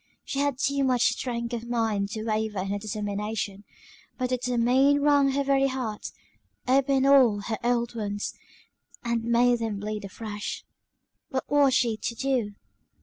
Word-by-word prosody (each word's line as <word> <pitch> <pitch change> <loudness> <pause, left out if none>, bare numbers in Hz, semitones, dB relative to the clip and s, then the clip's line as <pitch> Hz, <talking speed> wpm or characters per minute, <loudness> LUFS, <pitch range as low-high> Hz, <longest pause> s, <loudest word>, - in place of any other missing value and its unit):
She 275 - -4
had 285 -2 +1
too 280 +1 +1
much 250 -2 +3
strength 235 -1 -4
of 235 0 -4
mind 220 -4 0
to 215 - -4
waver 215 -2 -1
in 195 - -4
her 205 +1 -1
determination 205 -1 -4 0.5
but 255 -1 -1
to 255 - +2
determine 250 +3 +3
wrung 285 -1 +4
her 280 +1 +1
very 275 0 +3
heart, 250 -5 -4 0.6
opened 270 +1 +3
all 255 -7 +5
her 220 +1 -4
old 240 0 0
wounds, 205 -3 -3 0.7
and 235 -1 -1
made 240 +1 +3
them 225 -3 -2
bleed 210 0 -4
afresh. 210 +1 -6 0.6
What 260 -1 -3
was 280 -3 +4
she 230 -4 +2
to 235 - -4
do? 245 -5 -1
235 Hz, 155 wpm, -26 LUFS, 215-265 Hz, 0.7 s, all